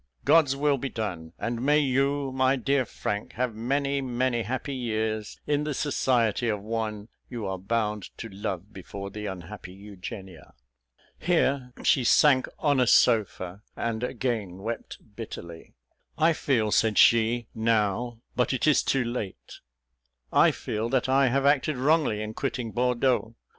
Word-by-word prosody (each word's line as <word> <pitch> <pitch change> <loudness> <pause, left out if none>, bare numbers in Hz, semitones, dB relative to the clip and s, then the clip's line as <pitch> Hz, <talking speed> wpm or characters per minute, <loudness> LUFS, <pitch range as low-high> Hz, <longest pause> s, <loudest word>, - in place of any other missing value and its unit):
God's 145 -5 +5
will 140 -1 +1
be 135 - -3
done; 90 -9 -5
and 120 0 -3
may 145 +3 +4
you, 140 0 +1
my 130 +1 +2
dear 135 +1 +1
Frank, 105 -2 -4
have 125 -1 -1
many, 140 +5 -1
many 125 -1 0
happy 130 +5 -3
years 110 -4 -2
in 145 0 +1
the 150 -2 -2
society 120 -5 +1
of 105 -2 -1
one 110 -1 -3 0.2
you 120 -4 -5
are 95 -1 -3
bound 105 0 -2
to 115 - -6
love 100 -1 -5
before 100 +1 -8
the 105 +1 -5
unhappy 95 0 -8
Eugenia." 95 - -10 0.6
Here 140 -7 +1
she 130 - +3
sank 130 +2 +5
on 145 -3 +2
a 125 - +3
sofa, 100 -5 +2
and 115 -1 -2
again 115 -7 -2
wept 115 +1 -5 0.2
bitterly. 85 -7 -9 0.4
"I 165 +1 +4
feel," 115 -8 0
said 110 -1 +2
she, 115 +1 +5
"now, 115 +1 0
but 125 +1 +1
it 130 - 0
is 155 -2 +5
too 135 -2 +1
late 115 -5 -6 0.7
I - - +6
feel 110 +2 -3
that 130 0 +1
I 135 0 +4
have 135 +2 +1
acted 145 0 +2
wrongly 135 -6 +2
in 110 0 -5
quitting 125 -2 -3
Bordeaux. 120 -2 +1
120 Hz, 150 wpm, -27 LUFS, 105-135 Hz, 0.7 s, I